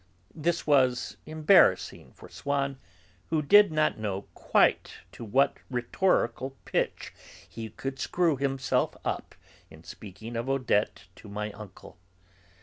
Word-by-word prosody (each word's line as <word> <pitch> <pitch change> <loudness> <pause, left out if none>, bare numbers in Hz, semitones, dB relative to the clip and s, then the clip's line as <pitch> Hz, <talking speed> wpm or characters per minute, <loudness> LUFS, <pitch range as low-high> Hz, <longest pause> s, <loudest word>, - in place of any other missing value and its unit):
This 170 +2 -1
was 130 -4 +2
embarrassing 155 - +3
for - - -14
Swann, 140 -1 -2 0.5
who 155 -2 0
did 205 +6 +6
not 155 -6 +1
know 100 -2 -3
quite - - +2 0.2
to - - -10
what 135 +6 +2
rhetorical 130 0 0
pitch - - -2 0.3
he 110 -1 -8
should 135 0 -4
screw 170 -4 +1
himself 135 -1 -1
up - - -4 0.3
in - - -15
speaking 110 +4 -10
of 120 +3 -3
Odette 125 -6 0
to 105 - -13
my 105 +1 -4
uncle. 100 -3 -13
135 Hz, 125 wpm, -28 LUFS, 110-150 Hz, 0.5 s, did